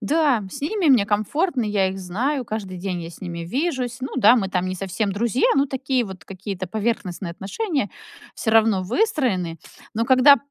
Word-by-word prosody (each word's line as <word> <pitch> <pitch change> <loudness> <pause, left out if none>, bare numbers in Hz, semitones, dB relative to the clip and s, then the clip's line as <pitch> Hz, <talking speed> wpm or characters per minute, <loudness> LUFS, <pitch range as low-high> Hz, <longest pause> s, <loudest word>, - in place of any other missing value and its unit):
да, 275 -1 +2
с - - -7
ними 365 +3 0
мне 225 -6 +5
комфортно, 245 - 0
я 205 -2 +1
их 190 +1 -5
знаю, 245 +10 -1
каждый 210 -5 -5
день 180 -1 -3
я 165 - -7
с 165 - -14
ними 175 -2 -5
вижусь. 250 - -2
Ну 260 - -5
да, 240 0 +6
мы 195 -4 0
там 185 -1 -1
не 185 - -2
совсем 195 +2 -2
друзья, 235 +4 +1
но 275 - +3
такие 260 -2 -1
вот 190 -5 -9
какие-то 195 -1 -6
поверхностные 200 -4 -2
отношения 275 - -2 0.4
всё 220 - -1
равно 220 -3 +4
выстроены. 220 - 0 0.4
Но 230 +2 +1
когда 260 +3 +7
215 Hz, 185 wpm, -23 LUFS, 190-260 Hz, 0.4 s, когда